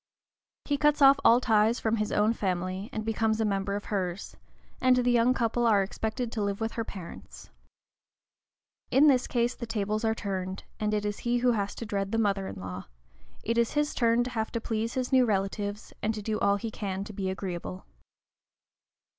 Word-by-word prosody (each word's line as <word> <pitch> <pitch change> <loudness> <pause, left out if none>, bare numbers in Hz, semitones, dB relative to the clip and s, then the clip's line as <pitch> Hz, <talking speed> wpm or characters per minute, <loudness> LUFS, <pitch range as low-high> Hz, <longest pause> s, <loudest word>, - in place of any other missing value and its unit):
He 285 - 0
cuts 295 0 +3
off 275 +1 +7
all 235 +1 +6
ties 225 -1 +3
from 225 0 0
his 215 -1 -1
own 210 +2 +3
family, 185 0 -2
and 215 0 -4
becomes 225 0 0
a 220 - +2
member 200 -1 -1
of 205 - -5
hers, 185 -1 -3 0.5
and 255 -1 +5
the 245 0 +2
young 240 +1 +3
couple 235 0 +1
are 205 -3 +4
expected 220 +4 -3
to 220 - -3
live 200 -1 -1
with 225 0 -2
her 230 - -3
parents. 190 -5 -10 1.4
In 280 +3 +5
this 260 -4 +4
case 240 0 +1
the 235 - -7
tables 215 0 -2
are 220 0 +1
turned, 190 -2 -4 0.2
and 210 0 0
it 210 0 -1
is 205 0 -3
he 240 0 0
who 245 0 +3
has 205 -3 -2
to 230 - -6
dread 200 -2 -2
the 225 - 0
mother 200 -3 +1
in - - -6
law; 90 0 -6 0.6
it 230 +1 0
is 235 - +1
his 295 0 0
turn 235 0 +3
to 250 - -5
have 220 -2 -2
to 230 - -1
please 225 0 -3
his 255 0 -2
new 260 -1 +5
relatives 205 -1 -2
and 220 +1 0
to 210 - -6
do 215 0 -1
all 200 0 +3
he 220 +2 -4
can 195 -2 -4
to 210 - -9
be 190 -1 -2
agreeable. 175 - -5
220 Hz, 205 wpm, -28 LUFS, 200-235 Hz, 1.4 s, off